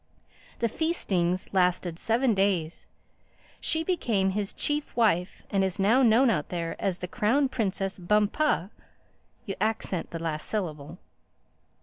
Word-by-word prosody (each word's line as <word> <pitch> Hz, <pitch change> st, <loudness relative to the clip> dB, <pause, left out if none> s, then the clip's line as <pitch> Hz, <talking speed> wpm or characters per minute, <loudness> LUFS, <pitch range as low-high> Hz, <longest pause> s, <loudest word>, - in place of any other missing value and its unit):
The 230 Hz, -, +1 dB
feastings 190 Hz, -, -1 dB
lasted 180 Hz, -2 st, +1 dB
seven 235 Hz, +2 st, +2 dB
days. 190 Hz, -5 st, 0 dB, 0.7 s
She 320 Hz, 0 st, +1 dB
became 225 Hz, -, 0 dB
his 200 Hz, 0 st, -2 dB
chief 295 Hz, 0 st, 0 dB
wife 200 Hz, -6 st, +1 dB
and 195 Hz, -1 st, +2 dB
is 190 Hz, -1 st, -1 dB
now 215 Hz, +7 st, +4 dB
known 240 Hz, +1 st, +5 dB
out 150 Hz, -8 st, -2 dB
there 170 Hz, -2 st, -3 dB
as 190 Hz, -3 st, 0 dB
the 180 Hz, -, -5 dB
Crown 250 Hz, +10 st, +1 dB
Princess 195 Hz, -5 st, -2 dB
Bum_pah_—you 210 Hz, -, -2 dB
accent 215 Hz, -5 st, -1 dB
the 165 Hz, -, -5 dB
last 160 Hz, -2 st, -4 dB
syllable." 160 Hz, -6 st, -4 dB
195 Hz, 125 wpm, -27 LUFS, 180-230 Hz, 0.7 s, known